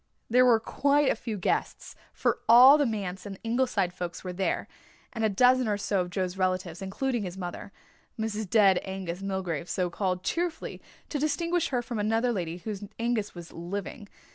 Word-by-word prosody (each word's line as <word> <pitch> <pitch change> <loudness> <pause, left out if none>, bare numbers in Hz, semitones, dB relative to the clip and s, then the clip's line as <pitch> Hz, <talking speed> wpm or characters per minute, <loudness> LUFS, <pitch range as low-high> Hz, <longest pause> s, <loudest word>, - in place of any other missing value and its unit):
There 250 +1 +6
were 230 -2 +5
quite 280 +4 +2
a - - 0
few 220 -1 -5
guests, 180 - -2 0.2
for - - 0
all 255 +5 +9
the 290 - +3
Manse 195 -3 -4
and 195 -1 -7
Ingleside 230 -6 0
folk 175 -1 -5
were 180 -1 -5
there, 190 +1 -1 0.5
and 225 -2 -3
a 220 - +3
dozen 250 +4 +4
or 205 -1 +1
so 200 -1 0
of 180 - -4
Joe's 185 0 -2
relatives, 185 -2 -1
including 235 +6 -2
his 185 -2 -5
mother, 180 +1 -6 0.5
"Mrs. 220 -2 -3
Dead 195 -4 +5
Angus 190 -2 -5
Milgrave," 185 -4 -3
so 180 -2 -1
called, 185 -1 -2
cheerfully, 345 - -3 0.3
to 295 - -2
distinguish 335 +3 0
her 245 -3 -1
from 235 -2 -4
another 225 +4 +1
lady 175 -6 -3
whose 205 +2 -6
Angus 230 -4 -1
was 175 -1 -9
living. 200 +4 -6
205 Hz, 180 wpm, -28 LUFS, 185-240 Hz, 0.5 s, all